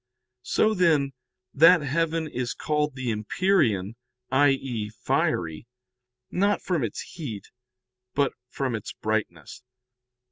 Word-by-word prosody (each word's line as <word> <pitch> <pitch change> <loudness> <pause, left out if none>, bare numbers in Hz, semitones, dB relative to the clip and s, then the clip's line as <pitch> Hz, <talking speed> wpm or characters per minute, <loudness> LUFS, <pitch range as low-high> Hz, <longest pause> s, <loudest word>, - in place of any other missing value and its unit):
So, 215 +12 +2
then, 155 -8 +2 0.4
that 165 +4 +7
heaven 165 +3 0
is 125 -4 -3
called 150 -2 -1
the 130 -3 -2
empyrean, 110 - +1 0.3
i.e. 135 -5 +2
fiery, 85 -4 -1 0.6
not 200 +2 +1
from 175 -7 0
its 110 - -3
heat, 120 - -8 0.6
but 140 -1 +2 0.2
from 135 -3 -2
its 110 -3 -5
brightness. 110 - -3
135 Hz, 105 wpm, -26 LUFS, 110-160 Hz, 0.6 s, that